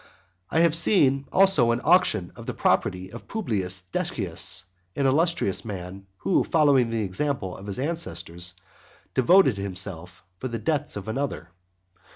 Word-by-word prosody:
I 160 - +2
have 170 -2 +4
seen 140 -6 +3
also 190 -11 +5
an 115 +1 +1
auction 110 - +3
of - - -11
the - - -4
property 95 0 0
of 115 - -11
Publius 95 - -1
Decius, 90 0 -2 0.3
an 140 - 0
illustrious 150 - +1
man, 95 -2 -7
who, 185 - +1
following 140 -7 +3
the 115 -1 -1
example 100 -1 -2
of 95 - -11
his 100 - -4
ancestors, 90 - -4 0.6
devoted 135 - +4
himself 95 -3 -5
for 130 - -4
the 115 -2 -4
debts 150 +6 -2
of 100 -1 -7
another. 110 -8 -4
115 Hz, 145 wpm, -25 LUFS, 95-150 Hz, 0.6 s, also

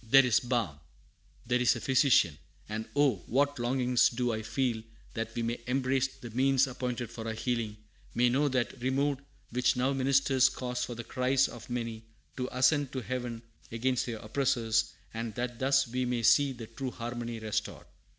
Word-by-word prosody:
"There 135 +4 +6
is 120 -4 +4
balm; 115 - -1 0.7
there 125 +1 +1
is 125 0 +4
a - - -4
physician! 130 - +4 0.3
and 110 +1 -4
oh 140 -6 +3
what 140 +2 +1
longings 125 0 +3
do 120 -1 -1
I 110 - -2
feel 120 0 -1 0.3
that 115 0 -4
we 120 - -1
may 115 +1 -2
embrace 130 +1 +1
the 120 -3 -11
means 135 +3 +3
appointed 125 -2 -4
for 115 -1 -6
our 110 - -3
healing; 115 -2 -2 0.4
may 125 +1 +4
know 135 +5 +2
that 130 -1 -1
removed 135 +2 0 0.3
which 125 +2 +2
now 130 +2 +2
ministers 135 0 +3
cause 125 -2 -3
for 120 - -4
the 120 - -6
cries 130 +3 +2
of 120 - -11
many 115 -2 -3 0.4
to 125 -1 -2
ascend 140 +2 +2
to 130 - -2
Heaven 120 -2 -4 0.3
against 125 +3 0
their 115 -2 -3
oppressors; 110 -1 0 0.2
and 115 -1 -4
that 120 -1 -3
thus 135 0 +3
we 125 +2 -1
may 120 -1 -1
see 140 +5 +5
the 120 -3 -7
true 125 +4 -5
harmony 120 -1 -5
restored! 110 -1 -3
125 Hz, 180 wpm, -30 LUFS, 115-130 Hz, 0.7 s, There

